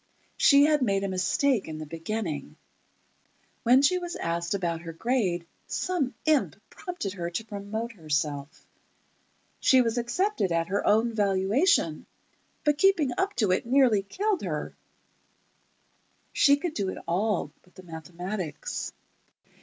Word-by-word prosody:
She 280 Hz, 0 st, +6 dB
had 300 Hz, -1 st, +3 dB
made 200 Hz, -5 st, +1 dB
a -, -, 0 dB
mistake 195 Hz, +6 st, +1 dB
in 155 Hz, -1 st, -6 dB
the 155 Hz, -, -6 dB
beginning: 165 Hz, -, -4 dB, 1.1 s
When 255 Hz, +4 st, +5 dB
she 365 Hz, +6 st, +4 dB
was 350 Hz, -1 st, -5 dB
asked 170 Hz, +2 st, -2 dB
about 170 Hz, -4 st, -2 dB
her 165 Hz, -1 st, -7 dB
grade, 185 Hz, -4 st, 0 dB, 0.2 s
some 330 Hz, -8 st, -1 dB
imp 310 Hz, -3 st, +2 dB, 0.2 s
prompted 355 Hz, -, -5 dB
her 170 Hz, -3 st, -4 dB
to 175 Hz, +6 st, -4 dB
promote 215 Hz, +2 st, -5 dB
herself. 150 Hz, -6 st, -3 dB, 0.9 s
She 260 Hz, -, +5 dB
was 230 Hz, +1 st, 0 dB
accepted 240 Hz, -, 0 dB
at 165 Hz, 0 st, 0 dB
her 200 Hz, -, 0 dB
own 225 Hz, +2 st, +3 dB
valuation, 200 Hz, -, +2 dB, 0.6 s
but 295 Hz, -1 st, +2 dB
keeping 365 Hz, -8 st, +4 dB
up 390 Hz, +2 st, -1 dB
to 210 Hz, -5 st, +2 dB
it 185 Hz, -, 0 dB
nearly 250 Hz, -5 st, +4 dB
killed 385 Hz, -, -1 dB
her. -, -, -4 dB, 1.6 s
She 280 Hz, 0 st, +5 dB
could 320 Hz, +2 st, -3 dB
do 200 Hz, -7 st, -1 dB
it -, -, -5 dB
all 185 Hz, -3 st, 0 dB
but 180 Hz, -, -27 dB
the 185 Hz, -, -12 dB
mathematics. 175 Hz, 0 st, -5 dB
205 Hz, 140 wpm, -27 LUFS, 175-275 Hz, 1.6 s, She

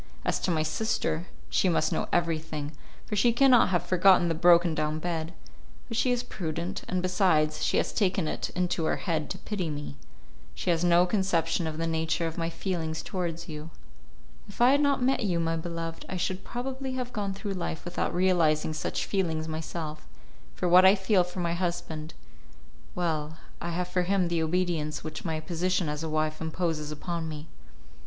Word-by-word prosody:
As -, -, +1 dB
to -, -, -1 dB
my 160 Hz, -3 st, +2 dB
sister, 170 Hz, -1 st, -1 dB, 0.2 s
she 185 Hz, -, +2 dB
must 165 Hz, -2 st, +2 dB
know -, -, -1 dB
everything, 160 Hz, -3 st, -1 dB, 0.3 s
for 210 Hz, -, -3 dB
she 220 Hz, +4 st, +4 dB
cannot 250 Hz, -1 st, +5 dB
have 175 Hz, -2 st, +1 dB
forgotten 185 Hz, -1 st, +5 dB
the -, -, +2 dB
broken 170 Hz, 0 st, +5 dB
down 155 Hz, 0 st, -1 dB
bed; 160 Hz, -1 st, -3 dB, 0.6 s
but 230 Hz, -, -5 dB
she 250 Hz, -, +2 dB
is 245 Hz, 0 st, 0 dB
prudent, 170 Hz, -1 st, -4 dB
and 185 Hz, 0 st, -1 dB
besides, 160 Hz, -5 st, +2 dB
she -, -, +2 dB
has -, -, 0 dB
taken 190 Hz, -5 st, +1 dB
it -, -, -3 dB
into 180 Hz, -2 st, 0 dB
her -, -, +2 dB
head 160 Hz, -5 st, -2 dB
to 190 Hz, -, -4 dB
pity 190 Hz, -3 st, -3 dB
me. 145 Hz, -1 st, -6 dB, 0.6 s
She 175 Hz, -, 0 dB
has 165 Hz, 0 st, +1 dB
no 175 Hz, 0 st, +5 dB
conception 175 Hz, -4 st, +1 dB
of 155 Hz, -1 st, -4 dB
the 165 Hz, -, -1 dB
nature 160 Hz, +1 st, 0 dB
of 165 Hz, 0 st, -3 dB
my 165 Hz, -1 st, -1 dB
feelings 165 Hz, -3 st, -3 dB
towards 170 Hz, -3 st, -3 dB
you. 155 Hz, -1 st, -7 dB, 0.8 s
If -, -, -12 dB
I 245 Hz, +2 st, +6 dB
had 285 Hz, +1 st, +4 dB
not 280 Hz, -3 st, +2 dB
met 265 Hz, -1 st, +2 dB
you, 180 Hz, -5 st, +1 dB
my 165 Hz, 0 st, 0 dB
beloved, 165 Hz, 0 st, -5 dB
I 185 Hz, -, -3 dB
should 185 Hz, +1 st, -2 dB
probably 260 Hz, +2 st, -4 dB
have 250 Hz, -1 st, -4 dB
gone 200 Hz, -3 st, -2 dB
through 200 Hz, 0 st, -4 dB
life 175 Hz, -3 st, -4 dB
without 175 Hz, 0 st, -1 dB
realizing 170 Hz, -4 st, +2 dB
such 155 Hz, -, -2 dB
feelings 160 Hz, -5 st, -1 dB
myself; 155 Hz, -1 st, -5 dB, 0.5 s
for 180 Hz, -, -1 dB
what 180 Hz, +1 st, +7 dB
I 190 Hz, +2 st, +8 dB
feel 190 Hz, -1 st, +3 dB
for 180 Hz, +1 st, -5 dB
my 170 Hz, -1 st, 0 dB
husband.... 170 Hz, -3 st, -3 dB, 0.8 s
well, 160 Hz, -3 st, -2 dB, 0.2 s
I 170 Hz, -, -3 dB
have 175 Hz, +1 st, -2 dB
for 180 Hz, 0 st, 0 dB
him 180 Hz, -1 st, +1 dB
the 170 Hz, -1 st, 0 dB
obedience 160 Hz, -2 st, -1 dB
which 155 Hz, 0 st, -6 dB
my 160 Hz, -3 st, -2 dB
position 175 Hz, +2 st, 0 dB
as 150 Hz, 0 st, -3 dB
a 160 Hz, -, -3 dB
wife 155 Hz, 0 st, -1 dB
imposes 160 Hz, -2 st, -2 dB
upon 165 Hz, +1 st, -4 dB
me." 155 Hz, 0 st, -7 dB
170 Hz, 190 wpm, -28 LUFS, 160-185 Hz, 0.8 s, I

